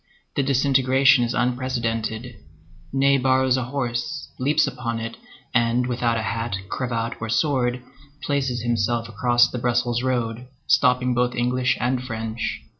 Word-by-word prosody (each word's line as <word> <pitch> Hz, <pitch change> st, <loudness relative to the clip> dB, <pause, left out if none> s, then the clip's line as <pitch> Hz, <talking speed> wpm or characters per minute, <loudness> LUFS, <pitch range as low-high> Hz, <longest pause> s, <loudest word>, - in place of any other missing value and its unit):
The -, -, +2 dB
disintegration 135 Hz, -1 st, +4 dB
is 120 Hz, +1 st, -1 dB
unprecedented. 120 Hz, -2 st, -2 dB, 0.5 s
Ney 140 Hz, +1 st, +3 dB
borrows 130 Hz, 0 st, +3 dB
a 130 Hz, -2 st, -1 dB
horse, 120 Hz, -, -3 dB
leaps 140 Hz, +4 st, +3 dB
upon 115 Hz, -2 st, -3 dB
it, 115 Hz, 0 st, -5 dB, 0.4 s
and 120 Hz, +1 st, +2 dB
without 120 Hz, -2 st, 0 dB
hat, 115 Hz, +1 st, -2 dB
cravat, 115 Hz, -2 st, -2 dB
or 115 Hz, -, -4 dB
sword, 125 Hz, -1 st, +1 dB, 0.4 s
places 130 Hz, -4 st, -1 dB
himself 115 Hz, 0 st, 0 dB
across 120 Hz, +2 st, +3 dB
the 125 Hz, -, -4 dB
Brussels 120 Hz, 0 st, 0 dB
road, 125 Hz, -1 st, -2 dB, 0.2 s
stopping 125 Hz, -1 st, +3 dB
both 125 Hz, 0 st, 0 dB
English 125 Hz, +1 st, +1 dB
and 125 Hz, +1 st, 0 dB
French. 115 Hz, -2 st, -4 dB
125 Hz, 130 wpm, -23 LUFS, 115-130 Hz, 0.5 s, disintegration